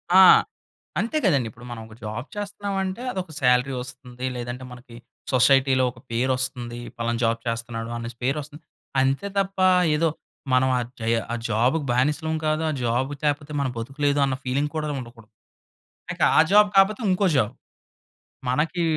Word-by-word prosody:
ఆ! 190 - +10 0.8
అంతే 235 +8 -1
కదండి! 140 - +3
ఇప్పుడు 120 +3 -14
మనం 115 -2 -6
ఒక 110 - -14
జాబ్ 110 +6 -5
చేస్తున్నామంటే, 200 0 -3
అదొక 185 -4 -5
సాలరీ 125 +1 +3
వస్తుంది. 125 0 -8
లేదంటే 120 +1 -5
మనకి 125 -1 -12 0.4
సొసైటీ‌లో 130 0 +4
ఒక 120 - -17
పేరు 125 +3 +1
వస్తుంది. 120 -2 -4 0.2
పలానా 115 0 -1
జాబ్ 115 0 +1
చేస్తున్నాడు 115 0 -3
అనేసి 115 0 -7
పేరు 135 +4 +1
వస్తుంది. 150 +2 -12 0.4
అంతే 135 +9 0
తప్ప 195 -1 -1 0.4
ఏదో 165 +1 +2 0.4
మనం 130 +1 +4
ఆ - - +1 0.2
జయ 115 +1 +2 0.2
ఆ - - 0
జాబ్‌కి 125 +8 +1
బానిసలం 150 +5 +1
కాదు. 155 +1 +1
ఆ - - 0
జాబ్ 120 +4 0
లేకపోతే 145 0 -1
మన 135 - 0
బతుకులేదు 140 +4 -1
అన్న 135 -1 -1
ఫీలింగ్ 140 +3 0
కూడా 155 -1 -1
ఉండకూడదు. 115 -2 -14 0.8
ఇక - - -10 0.2
ఆ - - +8
జాబ్ 210 0 +6
కాపోతే 200 +4 +4
ఇంకో 190 +2 +2
జాబ్. 110 -5 +1 1.0
మనకీ 155 +7 0
130 Hz, 155 wpm, -24 LUFS, 120-155 Hz, 1.0 s, ఆ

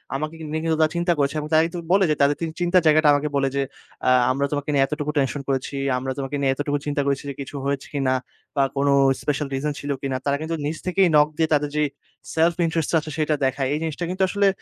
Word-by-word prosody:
আমাকে 155 +3 -3 0.2
নিয়ে 160 +1 -1
কিন্তু 160 -1 +1
তারা 155 0 +3
চিন্তা 170 0 +2
করেছে। 140 +1 0 0.2
তারা 160 +1 +5 0.3
বলে 195 0 +5
যে, 150 - +2
তাদের 140 +1 +4 0.2
চিন্তার 175 +1 +3
জায়গাটা 155 0 +5
আমাকে 145 +1 0
বলে 135 -1 +2
যে, 140 - +1 0.5
আ - - +6 0.2
"আমরা 140 +2 0
তোমাকে 145 0 -2
নিয়ে 140 -1 +4
এতটুকু 150 0 -3
টেনশন 140 0 0
করেছি, 135 0 -2 0.2
আমরা 130 +1 -3
তোমাকে 140 +1 -3
নিয়ে 135 -1 +3
এতটুকু 145 +1 -1
চিন্তা 145 -1 0
করেছি 140 0 0
যে, - - -4
কিছু 140 - -8
হয়েছে 140 0 -2
কিনা 135 -2 +1 0.4
বা 140 - +3
কোন 140 +1 +1 0.3
স্পেশাল 150 0 -1
রিজন 145 +2 -1
ছিল 145 - -4
কিনা!" 135 -2 -2
তারা 140 0 +1
কিন্তু 160 +1 -2
নিজ 155 +2 -2
থেকেই 185 +1 +3
নক 150 0 +6
দিয়ে 160 -1 +1
তাদের 150 0 +2
যে, 150 - +3 0.5
সেলফ 165 +1 +3
ইন্টারেস্ট 165 -2 -1
টা 165 - +4
আছে 155 - -8
সেটা 155 0 +2
দেখায়। 135 0 0
এই 150 - -1
জিনিসটা 160 +1 -3
কিন্তু 185 +1 0
আসলে 200 +1 +2
150 Hz, 230 wpm, -23 LUFS, 140-160 Hz, 0.5 s, আ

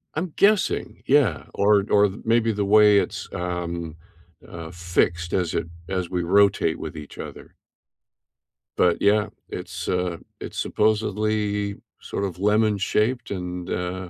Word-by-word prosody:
I'm 160 +1 -3
guessing. 205 0 +2
Yeah. 130 - +3
Or 100 -1 +3
or 105 0 +5
maybe 115 0 +2
the 100 -1 -1
way 105 0 +6
it's, - - -4
um, 85 -2 -4 0.5
uh, 85 -1 -8
fixed 85 0 -1
as 90 -4 0
it - - -1 0.2
as 95 -2 -2
we 90 -1 -1
rotate 95 -2 +3
with - - -6
each 75 -1 -10
other. - - -9 1.2
But, 90 -1 +3
yeah, 105 +1 +3 0.2
it's, - - -6
uh, 90 -2 -1 0.2
it's - - -8
supposedly 105 -1 0 0.3
sort - - -4
of 90 -3 -4
lemon 105 +1 +3
shaped, 110 +5 0
and, 90 -2 -5
uh, 90 0 -3
100 Hz, 135 wpm, -24 LUFS, 90-105 Hz, 1.2 s, way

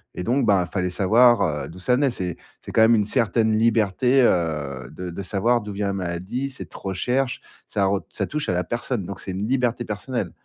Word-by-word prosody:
et 90 - -4
donc, 130 +7 +1
ben, 95 -3 +4
fallait 90 0 -2
savoir, 110 +5 +4 0.2
heu, - - -8
d'où 85 - -11
ça 125 +7 +2
venait. 140 +2 +2
C'est 90 -6 -4 0.2
c'est - - -8
quand - - +1
même 115 +1 +6
une 105 -2 +2
certaine 110 +1 +2
liberté, 115 +3 +3
heu, 75 - 0
de 90 -1 -7
de 95 +4 -6
savoir 110 +5 +1
d'où 105 0 -7
vient 100 +1 -2
la 100 - -1
maladie, 95 +8 -3
cette 130 - -9
recherche, 125 +7 -2 0.3
ça 100 -1 0
re 95 0 +1
ça - - -3
touche 150 0 -3
à - - +1
la 90 +1 0
personne. 120 -3 -3
Donc 100 +1 -7
c'est 95 - -6
une 95 +3 -3
liberté 125 -1 0
personnelle, 105 -2 -3
105 Hz, 220 wpm, -23 LUFS, 90-120 Hz, 0.3 s, même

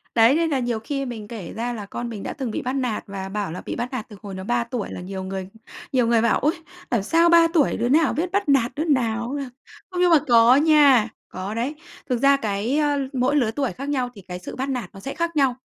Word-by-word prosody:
Đấy, 230 +4 +6
nên 330 0 +1
là 280 - +1
nhiều 240 -3 -1
khi 275 +4 -3
mình 220 -4 -7
kể 215 -7 -7
ra 240 +2 -3
là 215 -4 -6
con 240 +4 -5
mình 215 -4 -6
đã - - -4
từng 265 -5 -4
bị - - -3
bắt 255 - -2
nạt 250 -5 -2
và 195 -1 -6
bảo 200 -4 -3
là 180 - -6
bị - - -6
bắt 245 +2 -4
nạt 235 -4 -4
từ 210 - -11
hồi 200 -3 -7
nó 190 - -6
3 240 +2 0
tuổi 235 -3 -4
là - - -6
nhiều 190 +1 -6
người 190 0 -5 0.4
nhiều 250 -3 +3
người 230 -1 +3
bảo: 235 - +3
"Ôi, 305 +5 +2 0.4
làm 230 -5 +1
sao 335 +9 +3
3 335 -1 +7
tuổi 300 -4 +3
đứa 240 - 0
nào 305 +2 +3
biết 345 +4 -2
bắt 400 -4 0
nạt 260 -4 +3
đứa 310 - -1
nào, 235 -5 0
ơ." - - -3 0.5
Không, 360 - -3
nhưng 360 -1 +4
mà 325 - +7
có 235 +2 +6
nha. 285 -6 +5 0.2
Có 190 +3 -5
đấy. 250 +6 -2 0.4
Thực 245 - +1
ra 280 0 +5
cái, 220 +2 -1
ơ, 290 -2 +2
mỗi 260 +2 +1
lứa 245 -6 +2
tuổi 270 +2 -2
khác 275 +2 -7
nhau 255 -4 -1
thì 200 - -12
cái 180 0 -5
sự 180 - -8
bắt 265 +2 -3
nạt 250 -4 -3
nó 195 - -10
sẽ 270 +7 -6
khác 335 0 -2
nhau. 270 -4 +3
245 Hz, 270 wpm, -23 LUFS, 220-285 Hz, 0.5 s, 3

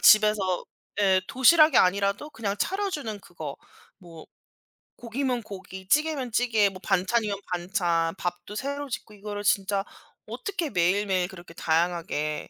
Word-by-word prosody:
집에서 210 -4 +5 0.4
예 190 -2 +4
도시락이 305 +3 +6
아니라도 200 +9 +2
그냥 215 -6 -3
차려 390 - -1
주는 225 - -4
그거. 160 -6 -8 0.4
뭐 170 -4 -13 0.7
고기면 245 +1 -2
고기, 190 -2 -9
찌개면 295 -1 +1
찌개, 225 -3 +3
뭐 190 -1 -11
반찬이면 200 +2 +1
반찬, 175 -2 0
밥도 180 +3 -5
새로 280 +5 -4
짓고 230 -3 -6
이거를 205 0 -6
진짜 200 -1 +1 0.4
어떻게 370 -6 -3
매일매일 185 -1 +1
그렇게 175 -3 -12
다양하게 165 -2 -1
200 Hz, 305 characters per minute, -26 LUFS, 180-240 Hz, 0.7 s, 도시락이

